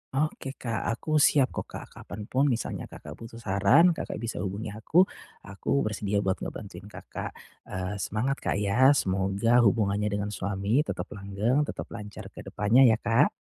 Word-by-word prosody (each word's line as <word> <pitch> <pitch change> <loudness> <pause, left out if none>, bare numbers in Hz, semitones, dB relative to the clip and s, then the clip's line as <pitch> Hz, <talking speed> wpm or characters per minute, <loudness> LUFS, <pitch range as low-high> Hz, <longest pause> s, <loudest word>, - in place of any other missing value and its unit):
Oke 135 -1 -1
Kak, 115 -2 -3
aku 155 +6 0
siap 140 -2 +4
kok - - -5
Kak - - -8
kapan 105 +1 -8
pun 135 +3 +3
misalnya 120 -4 -2
Kakak - - -11
butuh 115 0 -10
saran 110 - +5
Kakak 165 - -4
bisa 115 - -3
hubungi 100 +2 -4
aku, 110 - +3 0.4
aku 100 +8 -1
bersedia 105 -1 -1
buat 95 0 0
ngebantuin 100 -1 -7
Kakak. - - -7 0.3
Eee, 95 +2 -4
semangat 125 +9 -1
Kak - - -1
ya 110 +8 +4
semoga 95 +4 +2
hubungannya 105 -2 +2
dengan 100 0 -2
suami 100 +4 0
tetap - - -4
langgeng, 105 +8 0
tetap - - -6
lancar 105 -3 -8
ke - - -12
depannya 115 +5 +5
ya 110 - +5
Kak. 115 +7 +4
105 Hz, 165 wpm, -27 LUFS, 100-130 Hz, 0.4 s, saran